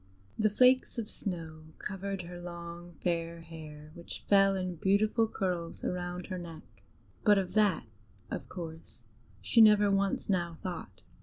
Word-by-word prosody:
The 215 0 +3
flakes 255 +4 +4
of 225 -3 -2
snow 165 -7 -5
covered 195 -1 -4
her 175 0 -8
long 170 0 -8
fair 170 -1 -1
hair, 155 -2 -10
which 170 +1 -8
fell 195 -1 +5
in 185 -2 -3
beautiful 210 +5 +3
curls 180 -5 -3
around 180 0 -3
her 185 -2 -4
neck; 165 -2 -11 0.4
but 205 -2 +6
of 190 -2 -1
that, 210 - +3 0.5
of - - -5
course, 160 -7 -8 0.4
she 230 - +5
never 210 -2 +7
once 195 0 +1
now 175 -4 0
thought. 180 -2 -6
180 Hz, 145 wpm, -31 LUFS, 170-200 Hz, 0.5 s, never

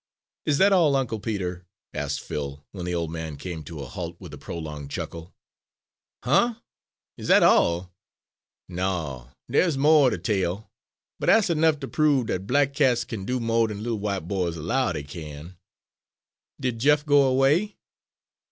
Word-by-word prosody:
_'" - - +1
"Is 140 - +2
that 195 +4 +5
all, 160 -7 +4
Uncle 120 -5 -1
Peter?" 95 -4 -4 0.3
asked - - -3
Phil, 70 0 -6
when 90 -3 -6
the 90 0 -2
old 85 -2 -2
man 80 -2 -5
came 85 +2 -6
to 80 -1 -7
a - - -6
halt 85 +6 -6
with - - -10
a - - -7
prolonged 75 -4 -7
chuckle. 85 +4 -7 0.9
"Huh?" 225 - +3 0.6
"Is - - -7
that - - +6
all?" 85 +2 +3 0.7
"No, 85 -9 -3 0.2
dey's 165 -6 +2
mo' 150 0 +5
er - - +5
de - - -2
tale, 95 -1 -2 0.5
but - - -3
dat's 215 -5 +5
ernuff 160 -2 +3
ter - - -5
prove 145 -5 +2
dat 95 -2 -3
black 140 +2 +2
cats 130 -4 +2
kin 105 -6 -6
do 125 0 0
mo' 115 -1 +2
dan 105 -1 -6
little 115 -2 -2
w'ite 100 -5 -3
boys 90 -3 -1
'low 95 - 0
dey 75 -4 -4
kin." 75 +3 -9 1.0
"Did 125 -3 -2
Jeff 145 +4 +3
go 145 -1 +5
away?" 135 +10 +2
100 Hz, 170 wpm, -25 LUFS, 85-135 Hz, 1.0 s, that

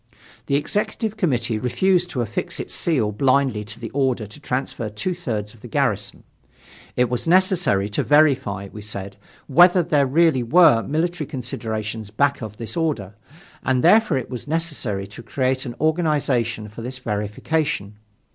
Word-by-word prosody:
The 140 - +1
Executive 210 +7 -1
Committee 120 - 0
refused 180 - +1
to 125 - -2
affix 110 -3 -3
its - - -5
seal 130 -11 +1
blindly 130 -1 +2
to 105 +1 -9
the 115 - -6
order 130 -5 0
to 105 +8 -13
transfer 125 -5 -3
two 105 - -3
thirds 110 - -4
of 115 - -19
the - - -9
garrison. - - -1 0.7
It 125 0 +3
was 125 +5 -3
necessary 180 - +3
to 105 - 0
verify, 135 -10 +2
we 105 - -8
said, 100 -1 -7 0.3
whether 175 +5 +5
there 150 -4 +2
really 160 -1 +3
were 120 -1 +5
military 160 - -2
considerations 110 -4 -4
back 140 +7 +1
of 105 -2 -7
this 115 +5 -5
order, 145 - -1 0.5
and 130 -1 +1
therefore 210 -3 +5
it 130 - -5
was 125 +1 -6
necessary 150 -11 -2
to 105 +4 -11
create 130 +3 -1
an 120 - -6
organization 145 -9 0
for 105 +2 -10
this 125 +2 -6
verification. 105 0 -2
130 Hz, 155 wpm, -22 LUFS, 110-155 Hz, 0.7 s, whether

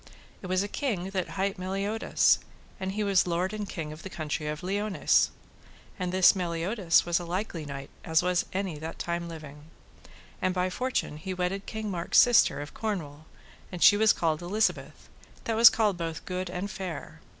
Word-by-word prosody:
It 185 - -7
was 185 +1 +1
a - - -3
king 200 -7 -3
that 185 -2 -2
hight 195 +1 -1
Meliodas, 195 +4 +1 0.4
and 190 0 -3
he 210 +1 -1
was 195 -3 +3
lord 180 +3 -1
and 210 -2 -4
king 155 -3 -5
of 155 - -11
the 190 - -7
country 155 -2 -4
of 150 +3 -4
Liones, 200 +2 +2 0.7
and 180 -1 -2
this 185 +1 +6
Meliodas 175 +1 +1
was 175 0 +1
a - - -6
likely 175 -2 -4
knight 140 -1 -7
as 160 0 +2 0.3
any 190 0 -2
was 150 - -8
that 160 +1 -6
time 170 0 -3
living. 150 -2 -10 0.8
And 185 0 0
by 180 0 0
fortune 250 -8 -2
he 185 +4 -5
wedded 185 +2 -2
King 220 -1 -4
Mark's 170 -2 0
sister 230 - +5
of 145 - -8
Cornwall, 155 -9 -4 0.4
and 180 -2 -2
she - - +8
was 215 0 +5
called 160 -2 0
Elizabeth, 210 +5 -1 0.4
that 225 - -1
was 230 +1 +10
called 210 -5 +1
both 165 -1 -4
good 185 0 -3
and 180 +3 -4
fair. 185 -6 -7
185 Hz, 185 wpm, -28 LUFS, 165-200 Hz, 0.8 s, was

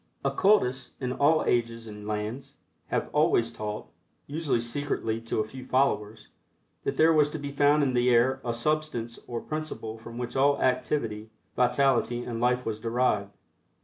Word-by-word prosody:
Occultists, 135 -11 +2
in 125 -2 -2
all 155 +4 +3
ages 115 -1 0
and 105 -1 -9
lands, 110 +5 -4 0.3
have - - -2
always 115 0 +3
taught, 105 0 -5 0.4
usually 150 -4 -1
secretly 115 -2 -2
to 115 -1 -1
a 110 - -4
few 130 +3 -9
followers, 110 -5 0 0.6
that - - -1
there 160 +1 +5
was 150 -2 +4
to 155 - -5
be 145 -1 -5
found 145 +1 +4
in 130 -2 +1
the 125 0 +3
air 125 +2 +3
a 120 - -1
substance 120 -2 -2
or 120 -1 -3
principle 155 -8 -5
from 115 +1 -10
which 120 -1 -4
all 140 +1 +3
activity, 115 -4 0 0.3
vitality 125 -1 +2
and 115 -1 -4
life 125 +1 +2
was 110 -1 -3
derived. 115 -3 0
125 Hz, 160 wpm, -27 LUFS, 115-140 Hz, 0.6 s, there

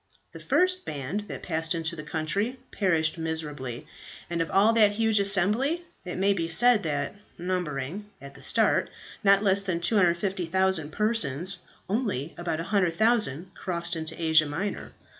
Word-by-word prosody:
The - - -10
first 370 0 +1
band 150 +9 -4
that - - -7
passed 165 -1 -1
into 165 +1 -2
that 155 -1 -8
country 195 +12 -1
perished 165 -5 +1
miserably, 150 -6 -4 0.5
and 170 -1 0
of 165 - -1
all 205 +4 +4
that 210 -3 +5
huge 220 0 +2
assembly, 210 - +1 0.2
it 180 - -5
may 195 +2 +3
be 165 -4 -2
said 235 +7 +4
that, 145 -5 -2 0.2
numbering, 180 +1 -3
at 140 +1 -11
the 135 - -15
start, - - +2 0.3
not 200 0 +5
less 200 -1 +3
than 185 -4 -2
250,000 185 -3 +1
persons, 185 - -1 0.3
only 195 - -2
about 175 -2 -3
100,000 185 - +1
crossed 170 -1 -3
into 160 0 -5
Asia 160 -2 +4
Minor. 175 +8 -4
180 Hz, 145 wpm, -27 LUFS, 160-205 Hz, 0.5 s, that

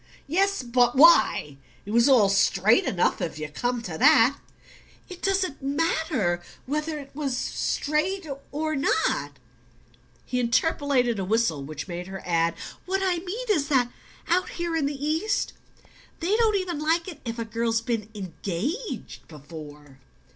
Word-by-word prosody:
"Yes; 390 +2 +1
but 245 0 +2
WHY? 265 - +5 0.3
It 205 - -6
was 235 +4 +4
all 240 -7 +6
straight 195 +3 +3
enough, 180 0 +1
if 165 -4 -3
you 155 0 -4
come 245 +9 -2
to 160 -6 -6
that." 240 +5 +6 0.7
"It 365 -1 -10
doesn't 380 -7 0
matter... 280 - 0 0.2
whether 305 +3 -2
it 280 -2 -10
was 275 -3 -2
straight... 320 +9 -1 0.3
or... 310 +1 -2
not 270 - 0 0.5
..." 120 +1 -33
He 250 - -2
interpolated 250 -1 +1
a - - -1
whistle 190 -8 +1
which 155 +3 -7
made 175 0 -6
her 190 0 -8
add: 165 -1 +1 0.3
"What 385 +1 0
I 360 -2 +1
mean 390 +8 -5
is 300 -8 +1
that 250 -4 +2 0.4
out 360 +2 +1
here 340 -1 -3
in 305 -4 +1
the 285 0 -4
East 325 +8 0 0.7
they 360 +5 +1
don't 445 -2 +3
even 365 -5 -2
like 325 +3 +1
it 345 -6 -8
if 230 -1 -5
a 230 - -3
girl's 225 0 0
been 230 -3 -3
ENGAGED 205 - -5
before." 150 -2 -12
255 Hz, 155 wpm, -25 LUFS, 195-325 Hz, 0.7 s, all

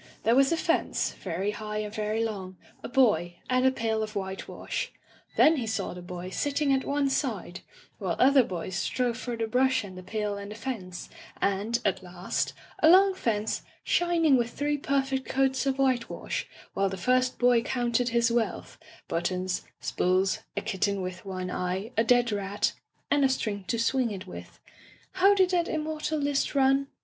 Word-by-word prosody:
There 225 - +4
was 275 +2 +5
a 335 - +2
fence, 330 +1 0
very 190 +5 -3
high 210 0 -5
and 210 -1 -3
very 215 +1 -1
long, 190 -4 -5 0.2
a - - -6
boy, 190 -10 +3 0.2
and 255 +1 +4
a - - +5
pail 225 -3 -1
of 215 0 -4
white 190 -1 -4
wash. - - -4 0.5
Then 315 +1 +6
he 240 -4 -2
saw 220 - -2
the 180 - -8
boy 180 +1 -7
sitting 285 +4 +1
at 265 - +1
one 285 0 +1
side, 225 - -2 0.4
while 185 -4 -1
other 270 +1 +6
boys 185 -5 -4
strove 245 +5 0
for 245 -1 -4
the 225 - 0
brush 250 +1 +2
and 190 -2 -9
the 185 - -8
pail 210 +1 -3
and 200 0 -7
the 210 - -7
fence, 210 -8 -5 0.3
and, 200 +4 +1
at 190 -2 +1
last, 180 0 -3 0.3
a 315 - +7
long 385 +2 +7
fence 220 - -1 0.2
shining 335 -5 +3
with 240 -1 0
three 295 +3 -1
perfect 270 -1 -1
coats 265 0 +1
of 270 0 +1
white 260 -3 +1
wash, - - -4 0.3
while 195 0 +1
the 190 - -5
first 255 +5 +2
boy 245 -1 +4
counted 240 0 0
his 235 0 +2
wealth 230 -5 -2
— - - -23
^buttons, 180 +2 -1 0.2
spools, 185 +2 +1 0.2
a - - +1
kitten 195 0 -1
with 185 +2 -6
one 185 -1 -4
eye, 185 +6 -2
a 225 - +3
dead 240 0 +3
rat, 200 0 -1 0.4
and 285 0 +4
a 270 - +5
string 205 -6 -2
to 230 - 0
swing 245 +1 +1
it 200 -2 -6
with 185 - -10 0.3
— - - -26
How 395 +2 +6
did 375 -2 +3
that 345 -2 +2
immortal 310 0 -2
list 285 -1 0
run 270 0 +3
230 Hz, 190 wpm, -28 LUFS, 195-270 Hz, 0.5 s, a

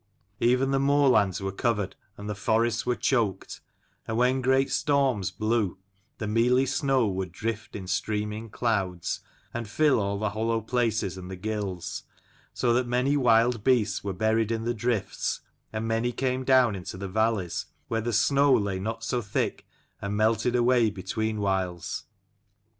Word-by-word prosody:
Even 125 +3 +3
the 135 - +2
moorlands 135 -9 +3
were 95 0 -2
covered 105 -1 -1 0.2
and 100 - -7
the 105 - -2
forests 110 +3 0
were 125 - +2
choked: 115 -8 -1 0.5
and 110 - -2
when 125 +2 +2
great 130 +1 +2
storms 135 - +1
blew, 110 -4 0 0.4
the 105 - -4
mealy 120 +4 +3
snow 135 -2 +1
would 95 -2 -3
drift 110 +4 -4
in 95 - -5
streaming 105 +3 -2
clouds, 95 -7 -1 0.3
and 115 -2 -4
fill 145 +1 +3
all 100 -1 -1
the 105 0 -1
hollow 115 +2 0
places 110 -5 -1
and 90 0 -9
the 95 - -5
gills: 100 -2 -4 0.5
so 120 -1 +1
that 125 +1 +1
many 125 +4 +1
wild 120 -3 +3
beasts 110 -5 +2
were 100 - -2
buried 110 +3 +1
in 115 -1 -1
the 120 +1 0
drifts, 115 -3 -2 0.3
and 110 +1 -3
many 115 +2 0
came 130 +1 -1
down 130 -4 +4
into 90 -1 -7
the 100 +1 -5
valleys, 105 -3 0 0.2
where 115 0 -1
the 120 +2 -2
snow 140 +5 +3
lay 100 -6 +2
68 - - -5
not 115 +2 -4
so 125 +1 -1
thick 105 -2 -2 0.3
and 100 +1 -2
melted 110 +3 +2
away 120 -1 +4
between 105 +3 -3
whiles. 95 -4 -2
110 Hz, 165 wpm, -27 LUFS, 100-125 Hz, 0.5 s, down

